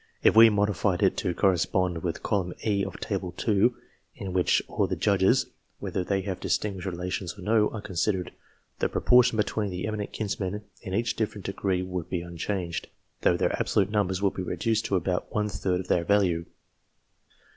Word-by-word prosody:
If - - +5
we 115 0 +10
modified 100 -3 +1
it - - +4
to 90 - -1
correspond 90 -2 +1
with 85 -2 -3
column 95 -4 -1
E 100 -3 +2
of 95 - -5
Table 95 -3 -3
II., 105 +1 +5 0.5
in 95 -2 -6
which 90 -1 +3
all - - 0
the - - -1
Judges, - - +3 0.3
whether 90 - -3
they 95 +1 0
have 95 -1 -4
distinguished 100 -3 -1
relations 90 0 -4
or 95 - -10
no, 105 +1 +3
are 110 - -6
considered, 95 -1 -1 0.5
the - - +1
proportion 125 -2 +4
between 105 -1 0
the 90 -1 -4
eminent 105 -1 -3
kinsmen 105 -1 -3 0.2
in 95 -3 -4
each 115 +3 0
different 105 -3 -3
degree 95 -1 -1
would 90 -2 -4
be 90 - -1
unchanged, 85 0 -3 0.3
though - - +3
their - - +2
abso - - -2
lute 100 0 +3
numbers 100 -2 0
would 100 - +2
be - - -4
reduced 110 +5 -1
to 100 - 0
about 90 0 -1
one 105 -1 0
third 90 -2 -1
of 90 - -11
their 85 - +2
value. 90 -3 +2
95 Hz, 185 wpm, -27 LUFS, 90-105 Hz, 0.5 s, we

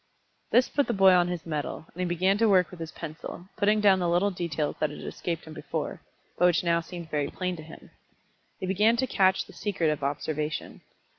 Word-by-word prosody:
This 250 - +4
put 285 -1 0
the 235 - 0
boy 195 -1 +7
on 175 -1 +4
his 175 -2 -4
mettle, 155 -1 -4
and 180 - -13
he 180 - 0
began 185 +3 +2
to 225 -1 +4
work 185 -4 +4
with 180 - -11
his 165 -1 -6
pencil, 165 +2 -8
putting 210 +1 +3
down 200 -2 +5
little 175 +3 +2
details 165 -5 -2
that 155 - +1
had 150 - -9
escaped 170 -2 -4
him 160 - -10
before, - - -4 0.4
but 180 - +5
which 175 0 +2
now 170 -1 +2
seemed 170 -1 -9
very 145 -2 0
plain 180 -1 -3
to - - -8
him. 160 +1 -13 0.7
He - - -3
began 210 +5 +3
to 260 - +2
catch 190 -5 +2
the - - -15
secret 185 -6 0
of 150 - -3
observation. 150 +2 -3
175 Hz, 215 wpm, -27 LUFS, 160-190 Hz, 0.7 s, boy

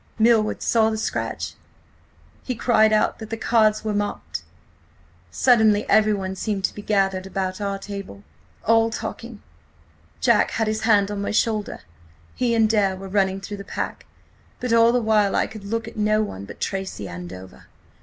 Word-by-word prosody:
"Milward 220 -1 +3
saw 220 -1 +3
the 220 - -2
scratch. 220 - -3 0.9
He 250 - -4
cried 220 -2 +3
out 215 0 +2
that 220 -1 -8
the 225 - -3
cards 215 -2 +2
were 215 -1 -1
marked! 85 - -3 0.9
Suddenly 220 - +3
everyone 205 -3 +2
seemed 200 0 -3
to - - 0
be 210 - -8
gathered 195 -2 0
about 190 0 -3
our 200 -1 -2
table–all 195 - -2
talking! 230 0 -7 0.8
Jack 235 -4 +3
had 225 - +1
his 215 0 -1
hand 205 -3 +3
on 205 -1 -3
my 200 - -2
shoulder; 215 -1 -1 0.5
he 240 -2 0
and 225 -1 +4
Dare 205 -3 +2
were 195 +1 -8
running 195 -1 +1
through 205 +1 -6
the 200 - -8
pack. - - -5 0.5
But 250 -2 -1
all 230 0 +6
the 245 - +2
while 210 -2 +2
I - - +2
could 215 -2 -10
look 225 +2 -3
at - - -10
no 215 0 +2
one 100 - -6
but - - -11
Tracy–Andover. 95 - -6
210 Hz, 165 wpm, -23 LUFS, 195-220 Hz, 0.9 s, all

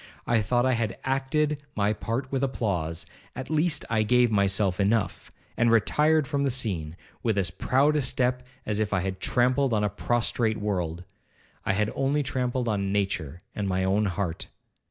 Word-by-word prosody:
I 115 -2 +2
thought 120 +4 +1
I 130 - +3
had 115 -3 -1
acted 140 +3 0
my 105 0 +2
part 120 +5 -3
with 135 -2 0
applause, 90 - -1 0.3
at 130 +3 -6
least 155 0 +1
I 110 -1 +1
gave 120 +2 +3
myself 100 -2 +1
enough, 100 -2 0 0.3
and 120 - +3
retired 150 +7 +3
from 140 +1 0
the 140 - +2
scene 95 -11 -2 0.2
with 110 -3 0
as 95 -3 +1
proud 135 +10 +2
a 150 - +2
step 125 -1 0 0.2
as 105 -1 -1
if 110 -1 0
I 90 - +2
had 95 0 -3
trampled 125 +4 +2
on 105 -1 +2
a 105 - +2
prostrate 115 0 0
world, 90 -5 -2 0.6
I 100 - +3
had 105 +2 0
only 140 +2 +1
trampled 125 -1 -1
on 100 -3 0
nature 95 -6 -2
and 105 -1 -2
my 95 0 0
own 100 +3 +2
heart. 90 -2 -3
110 Hz, 175 wpm, -26 LUFS, 100-130 Hz, 0.6 s, I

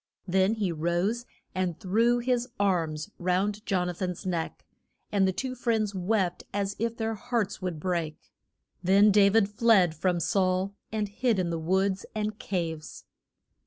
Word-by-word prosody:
Then 190 +4 +3
he 205 -5 -1
rose 175 +9 -1 0.3
and 185 -3 -2
threw 230 +6 +2
his 245 0 0
arms 165 -6 0
round 195 +4 0
Jon 180 -3 +1
a 180 - -2
than's 180 +1 -4
neck, 170 -3 -3 0.5
and 195 -2 +3
the - - +2
two 255 +7 -3
friends 225 -4 0
wept 190 -1 0
as 200 0 -2
if 230 +1 -1
their 225 0 -1
hearts 220 -2 -2
would 180 -4 -3
break. 165 -3 -2 0.6
Then 200 +3 +5
Da 200 0 +6
vid 210 0 +4
fled 205 -5 +4
from 175 +2 0
Saul, 185 +3 +1 0.2
and 215 -1 -1
hid 220 +2 0
in 180 -2 0
the 165 - -2
woods 190 +3 0
and 215 0 -2
caves. 165 -5 -4
195 Hz, 160 wpm, -28 LUFS, 180-215 Hz, 0.6 s, Da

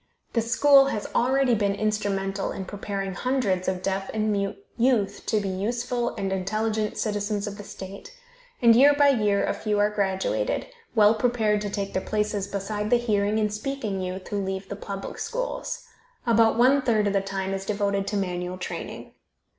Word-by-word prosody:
This 230 -1 0
school 275 +3 +6
has 215 -6 -2
already 260 +1 +3
been 200 -2 +1
instrumental 200 -2 -1
in 190 - -5
preparing 195 -1 -4
hundreds 205 -5 0
of 185 -1 -1
deaf 195 0 -1
and 215 0 +1
mute 200 -1 -1 0.2
youth 230 -5 +1
to 215 - +2
be 200 - -3
useful 240 +5 -2
and 195 -1 -2
intelligent 215 +3 -1
citizens 205 -1 -1
of 205 0 -6
the - - -6
state, 195 - -9 0.5
and 230 -1 +8
year 285 +4 +7
by 285 0 +5
year 210 -6 +2
a - - 0
few 210 -1 -1
are 205 +1 +3
graduated, 200 - -1 0.3
well 210 -1 +6
prepared 220 -2 +1
to 205 - -3
take 200 -1 -3
their 190 - 0
places 210 -1 -1
beside 205 +1 -3
the 245 - +5
hearing 210 -3 +1
and 210 -1 0
speaking 215 -4 -3
youth 185 +1 -5
who 200 -1 -1
leave 190 0 -4
the 200 - -4
public 195 -1 -6
schools. - - -4 0.4
About 225 -1 +4
one 260 +4 +5
third 225 -5 +2
of 200 - +1
the 195 - +2
time 195 0 -3
is 195 0 -3
devoted 200 -1 -1
to 205 - -1
manual 180 -1 -2
training. 185 - -6
210 Hz, 180 wpm, -25 LUFS, 195-230 Hz, 0.5 s, and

